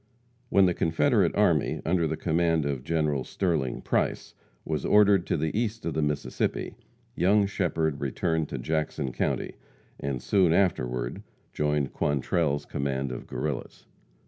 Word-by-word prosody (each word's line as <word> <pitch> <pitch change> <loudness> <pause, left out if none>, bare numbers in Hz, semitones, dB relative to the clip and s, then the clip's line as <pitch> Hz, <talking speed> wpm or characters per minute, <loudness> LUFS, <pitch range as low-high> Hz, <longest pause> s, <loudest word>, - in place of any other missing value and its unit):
When 100 -1 +5
the 90 - +2
Confederate 85 - +2
army, 85 -9 +2
under 85 -1 +2
the 80 +1 -2
command 80 -2 +1
of 70 -3 -2
General 75 -3 0
Sterling 80 -9 -1
Price, - - -1 0.3
was 80 -1 -2
ordered 100 -3 +4
to - - +1
the 80 +3 -2
east 110 0 -2
of 85 - -1
the 80 - 0
Mississippi, 75 -1 -2 0.4
young 100 +4 +3
Shepherd 80 -7 -1
returned 80 +4 -1
to 70 - -4
Jackson 75 -1 -2
county, - - -2 0.4
and 70 -2 -3
soon 90 +3 +3
afterward 65 -10 0 0.3
joined 75 -2 0
Quantrell's 75 +1 0
command 70 -1 -2
of - - -7
Guerrillas. 75 -4 -4
80 Hz, 140 wpm, -27 LUFS, 70-90 Hz, 0.4 s, When